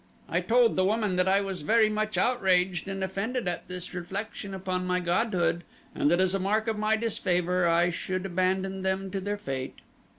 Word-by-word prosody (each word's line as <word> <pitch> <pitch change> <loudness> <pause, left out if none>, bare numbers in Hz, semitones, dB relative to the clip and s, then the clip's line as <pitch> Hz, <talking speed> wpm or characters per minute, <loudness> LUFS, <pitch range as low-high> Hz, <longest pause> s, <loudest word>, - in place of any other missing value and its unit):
I - - 0
told 240 0 +3
the 185 - +4
woman 210 -1 +1
that 180 +1 +2
I 195 +1 +4
was 190 -4 -4
very 220 +7 +4
much 215 0 -1
outraged 190 -7 +2
and 195 0 -3
offended 200 +5 -2
at 175 - -3
this 180 0 -6
reflection 195 +2 -5
upon 185 -1 -3
my 180 0 +1
godhood 175 -1 0 0.3
and 145 - +1
that 175 +2 +3
as 185 0 +2
a 195 - +1
mark 215 +4 0
of 225 - 0
my 215 +1 +1
disfavor 180 -5 0
I 170 +1 +3
should 185 +2 -3
abandon 190 +1 0
them 190 0 -1
to 195 0 -3
their 205 +2 -2
fate. 135 -9 -5
190 Hz, 195 wpm, -28 LUFS, 180-210 Hz, 0.3 s, the